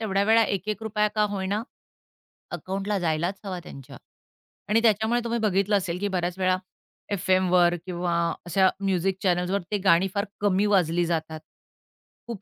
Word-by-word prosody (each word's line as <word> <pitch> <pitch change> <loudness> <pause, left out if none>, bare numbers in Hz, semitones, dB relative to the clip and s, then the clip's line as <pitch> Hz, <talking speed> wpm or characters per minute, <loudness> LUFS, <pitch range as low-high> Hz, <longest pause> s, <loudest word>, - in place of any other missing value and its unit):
तेवढ्या 200 -2 0
वेळा 225 +1 +5
₹1-₹1 210 +2 -1
का 215 - +2
होईना, 200 +2 -2 0.9
अकाउंटला 195 +1 -3
जायलाच 170 +3 -1
हवा 185 -2 -4
त्यांच्या 135 -4 -11 0.7
आणि 225 +2 +3
त्याच्यामुळे 220 +1 +2
तुम्ही 235 0 -1
बघितलं 205 -1 +2
असेल, 180 -2 -3
की 205 - -1
बऱ्याच 180 -1 -2
वेळा 185 0 +2 0.5
एफएमवर 180 -2 +3
किंवा 175 -1 -2 0.3
अशा 190 +2 +3
म्युझिक 195 -1 0
चॅनल्सवर 180 +1 +1
ते 210 - +1
गाणी 180 +1 +5
फार 200 - 0 0.2
कमी 200 0 +2
वाजली 175 -4 +2
जातात. 160 -2 -3 0.9
खूप 230 -5 -6
190 Hz, 140 wpm, -25 LUFS, 175-205 Hz, 0.9 s, वेळा